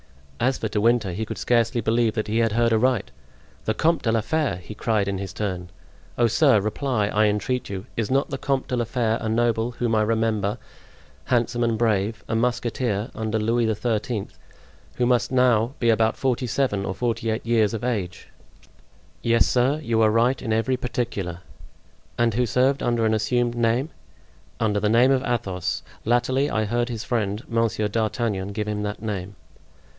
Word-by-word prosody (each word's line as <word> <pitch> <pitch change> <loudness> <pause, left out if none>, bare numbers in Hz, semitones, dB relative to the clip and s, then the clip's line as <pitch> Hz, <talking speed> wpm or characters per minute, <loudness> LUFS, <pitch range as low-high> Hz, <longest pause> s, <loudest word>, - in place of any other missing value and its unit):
As 130 +1 +1
for 110 - -2
De 105 -1 -1
Winter 115 -3 +2
he 100 +6 -3
could 110 - -6
scarcely 120 0 +1
believe 115 0 +1
that 110 - -1
he 110 +2 0
had 115 -2 +2
heard 115 0 +2
aright. 120 0 +1 0.5
"The 110 - 0
Comte 165 +5 +2
de 115 - +1
la 115 0 +2
Fere!" 155 - 0
he 90 +4 -9
cried 110 -2 0
in 100 -1 -2
his 95 -2 -6
turn. 90 -3 -4 0.5
"Oh, 120 - +4
sir, 120 +1 +4
reply, 110 +1 -1
I 105 0 +3
entreat 115 +5 -1
you—is 100 +3 -4
not 135 +2 +1
the 135 - -3
Comte 135 -2 -1
de 125 - -1
la 120 -1 0
Fere 115 -1 0
a 110 - -2
noble 115 +1 +1
whom 120 -1 -1
I 110 - +3
remember, 110 -1 0 0.7
handsome 120 -1 +1
and 115 -1 +1
brave, 110 -1 0
a - - -3
musketeer 120 -2 -1
under 110 0 -2
Louis 115 +1 +1
XIII., 110 -1 -2 0.7
who 125 - +1
must 120 -1 +2
be 130 - -3
now 125 0 +3
about 115 -1 +3
forty 130 -1 0
seven 120 -5 0
or 95 - -3
forty 115 +1 -1
eight 110 +1 -2
years 115 -2 +2
of 110 - -5
age?" 100 -8 -3 0.9
"Yes, 115 0 +3
sir, 130 +4 +2
you 115 -3 +1
are 110 - +5
right 120 +4 +2
in 115 - -3
every 115 +4 +1
particular!" 110 -8 -3 0.8
"And 120 -1 +2
who 125 +2 +1
served 130 +4 +2
under 120 -2 +1
an 110 - +2
assumed 120 +3 +1
name?" 120 +4 +1 0.7
"Under 105 -2 +1
the 105 - +1
name 120 +4 +5
of 130 -1 +3
Athos. 95 -9 -2 0.2
Latterly 125 +4 +1
I 110 -4 0
heard 120 +3 -1
his 115 -2 -4
friend, 110 -2 -1
Monsieur 115 -2 0
d'Artagnan, 105 -2 -1
give 105 0 -3
him 105 -1 -2
that 105 +1 -4
name." 100 -2 -4
115 Hz, 185 wpm, -24 LUFS, 105-120 Hz, 0.9 s, are